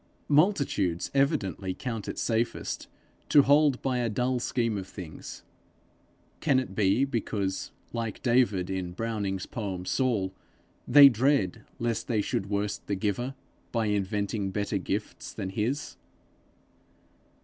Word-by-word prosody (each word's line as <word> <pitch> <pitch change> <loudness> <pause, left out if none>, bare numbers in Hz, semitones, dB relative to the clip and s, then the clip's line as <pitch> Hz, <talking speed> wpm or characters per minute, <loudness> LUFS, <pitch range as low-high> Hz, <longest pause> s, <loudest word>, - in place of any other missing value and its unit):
Multitudes 140 - +2
evidently 105 - 0
count 115 -5 -4
it - - -4
safest 115 0 -1 0.4
to 145 - +7
hold 145 -1 +4
by 130 -2 0
a 120 -1 0
dull 125 +3 0
scheme 115 -2 0
of 95 -2 -4
things: 90 -6 -9 1.0
can 140 -5 +3
it 105 -8 -5
be 100 +6 +3
because, 105 -7 -2 0.2
like 115 -2 -3
David 115 -7 +2
in 90 -2 -3
Browning's 100 -2 -2
poem 95 -6 -4
Saul, 105 -6 0 0.5
they 140 +2 +10
dread 125 -6 +2
lest 115 -1 -2
they 115 -3 +1
should 100 -1 -2
worst 100 0 -2
the 100 - 0
Giver 110 +7 -2 0.4
by 115 -2 0
inventing 100 0 -1
better 100 +1 -1
gifts 100 +3 -4
than 95 -3 -4
his? 115 +8 -2
110 Hz, 125 wpm, -28 LUFS, 95-125 Hz, 1.0 s, they